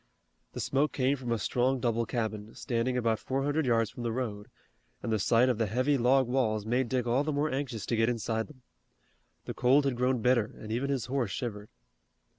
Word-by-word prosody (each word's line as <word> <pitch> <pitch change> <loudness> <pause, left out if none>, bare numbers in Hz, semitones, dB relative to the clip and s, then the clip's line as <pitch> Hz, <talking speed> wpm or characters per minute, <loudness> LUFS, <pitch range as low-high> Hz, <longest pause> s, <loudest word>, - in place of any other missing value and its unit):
The - - -5
smoke 140 +3 +1
came 135 +1 +2
from 125 -3 -5
a 115 - +2
strong 125 +5 +1
double 115 -1 0
cabin, 110 -3 -3
standing 125 0 -1
about 115 -3 +1
four 135 +1 -2
hundred 145 0 0
yards 115 -3 +2
from - - -9
the 120 -1 -1
road, 110 -4 -4 0.6
and 115 - -2
the 110 - +1
sight 115 +6 +4
of 125 -3 0
the 115 - +1
heavy 130 +7 +1
log 130 +1 +3
walls 110 -5 0
made 120 +2 0
Dick 125 -2 0
all 125 +4 +2
the 155 - -1
more 145 +1 0
anxious 130 -5 -3
to 120 - 0
get 115 +1 +2
inside 110 -1 -1
them. 130 -4 -17 0.8
The - - -4
cold 135 +3 +3
had 135 -3 +1
grown 125 +1 +1
bitter 120 -4 +2
and 110 - -8
even 125 +5 -1
his 135 -5 -1
horse 130 -4 -1
shivered. 105 -1 -5
125 Hz, 215 wpm, -30 LUFS, 115-130 Hz, 0.8 s, sight